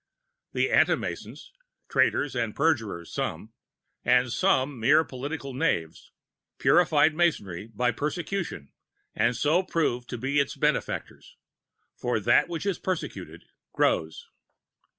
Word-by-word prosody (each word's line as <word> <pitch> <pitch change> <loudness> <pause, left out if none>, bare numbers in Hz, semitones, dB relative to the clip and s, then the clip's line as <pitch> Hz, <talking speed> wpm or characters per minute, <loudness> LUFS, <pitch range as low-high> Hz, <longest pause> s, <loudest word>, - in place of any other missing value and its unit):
The - - +1
Anti - - +5
Masons, - - -7 0.3
traitors 145 -2 +1
and 115 -3 -2
perjurers 110 - 0
some, - - -4 0.5
and 125 -1 +3
some 140 -8 +1
mere 140 +8 +5
political 140 0 -6
knaves, 80 -10 -2 0.5
purified 160 -3 +4
Masonry 110 - 0
by 120 +2 0
persecution, 160 - -4 0.4
and 120 +1 +1
so 155 +8 +2
proved 145 -9 -1
to 125 - -4
be 135 +4 0
its 140 - 0
benefactors; - - -2 0.6
for 120 -2 -1
that 120 - +3
which 170 +2 -4
is 200 -3 -1
persecuted, 185 -3 -5 0.3
grows. 80 0 0
135 Hz, 115 wpm, -27 LUFS, 115-160 Hz, 0.6 s, Anti